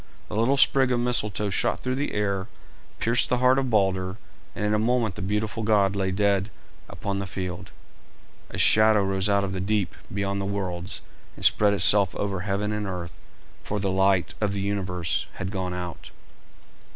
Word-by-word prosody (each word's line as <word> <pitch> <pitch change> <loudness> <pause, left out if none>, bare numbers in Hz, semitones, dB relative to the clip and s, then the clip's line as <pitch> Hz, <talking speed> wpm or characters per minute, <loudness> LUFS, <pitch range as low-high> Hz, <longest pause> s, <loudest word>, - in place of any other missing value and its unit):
The 110 - -5
little 120 +6 +2
sprig 135 -1 +4
of 120 - +1
Mistletoe 105 -4 +2
shot - - 0
through 130 - -2
the 140 +3 -2
air, 100 -2 -1 0.5
pierced 115 +2 +1
the 125 - +2
heart 125 +2 +4
of 130 -2 -1
Balder, 95 -3 +1 0.4
and 105 - -2
in 105 - +1
a 105 - +2
moment 115 -2 +1
the 105 - -8
beautiful 105 +3 -2
god 105 -2 +2
lay 95 -1 0
dead 100 +1 +1 0.4
upon 100 -1 -4
the 100 - -4
field. 90 0 -5 0.8
A - - -7
shadow 110 -1 +5
rose 95 +1 0
out 100 0 +2
of 95 -1 -3
the 95 - -3
deep 105 0 0 0.2
beyond 100 0 -2
the - - -3
worlds 95 -2 -4 0.3
and - - -3
spread 105 -1 +4
itself 100 -2 +4
over 100 -2 -2
heaven 100 +2 -2
and 105 -1 -3
earth, 90 -2 -6 0.4
for 105 - -3
the 95 -1 -1
light 95 -1 +2
of 105 -2 0
the 100 - -2
universe 95 -4 -2
had 95 0 -5
gone 95 -2 -3
out. 90 -1 -7
100 Hz, 185 wpm, -25 LUFS, 95-105 Hz, 0.8 s, shadow